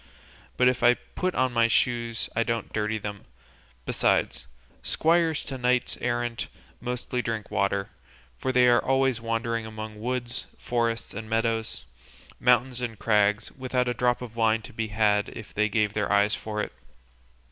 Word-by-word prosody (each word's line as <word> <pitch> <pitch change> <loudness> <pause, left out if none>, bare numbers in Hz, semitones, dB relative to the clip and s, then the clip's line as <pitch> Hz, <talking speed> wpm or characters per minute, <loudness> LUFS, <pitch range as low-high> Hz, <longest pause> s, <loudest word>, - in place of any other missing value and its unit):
But 125 - +5
if 125 -1 +2
I 120 +1 +6
put 185 +7 -4
on 130 -1 +1
my 115 -1 +4
shoes 115 0 +1
I 115 - +2
don't 115 -1 -2
dirty 105 0 0
them; 105 -1 -6 0.6
besides, - - +1 0.3
squires 165 -1 +2
to 135 - -6
knights 125 0 +1
errant 120 -1 -1 0.3
mostly 125 +1 -2
drink 115 -3 -4
water, 100 -1 0 0.4
for 100 - -2
they 125 -1 +5
are 120 0 +5
always 135 -3 +2
wandering 115 0 -1
among 110 -1 -7
woods, 120 0 -3
forests 115 -1 -1
and 110 -1 -7
meadows, 115 0 -1 0.5
mountains 125 +1 +3
and 115 -3 -3
crags, 105 0 +2
without 130 -1 -1
a 125 - +1
drop 125 +1 +1
of 115 -2 -9
wine 110 -1 +2
to - - -11
be 110 0 -2
had 105 -1 +2
if 110 - -10
they 105 +1 +2
gave 105 -1 +1
their 105 -1 -1
eyes 100 +1 +4
for 105 -1 -3
it." - - -6
115 Hz, 160 wpm, -27 LUFS, 110-125 Hz, 0.6 s, I